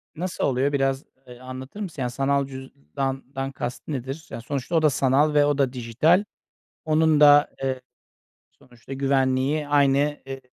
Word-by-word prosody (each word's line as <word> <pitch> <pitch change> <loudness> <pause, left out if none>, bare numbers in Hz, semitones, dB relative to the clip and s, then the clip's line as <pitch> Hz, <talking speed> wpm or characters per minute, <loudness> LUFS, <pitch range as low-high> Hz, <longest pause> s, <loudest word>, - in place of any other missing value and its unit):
Nasıl 175 +3 -4
oluyor 135 +1 +1
biraz, 135 -1 0 0.2
eee, 125 -1 -12
anlatır 130 +7 -9
mısın? 180 -9 -6
Yani 125 -1 -2
sanal 140 +2 0
cüzdandan 135 - -5
kast 125 -2 -6
nedir? 135 +2 -5
Yani 115 - -6
sonuçta 140 +6 -4
o 160 - +4
da 155 - +4
sanal 140 +2 +2
ve 145 -1 +4
o 145 -1 +1
da 135 -3 +1
dijital, 130 - +2 0.6
onun 155 -1 +3
da, 145 0 +7
eee, 130 -1 -2 0.7
sonuçta 120 +2 -15
güvenliği 135 +2 0
aynı, 140 -2 +3 0.3
eee, 135 0 -6
135 Hz, 155 wpm, -24 LUFS, 130-145 Hz, 0.7 s, da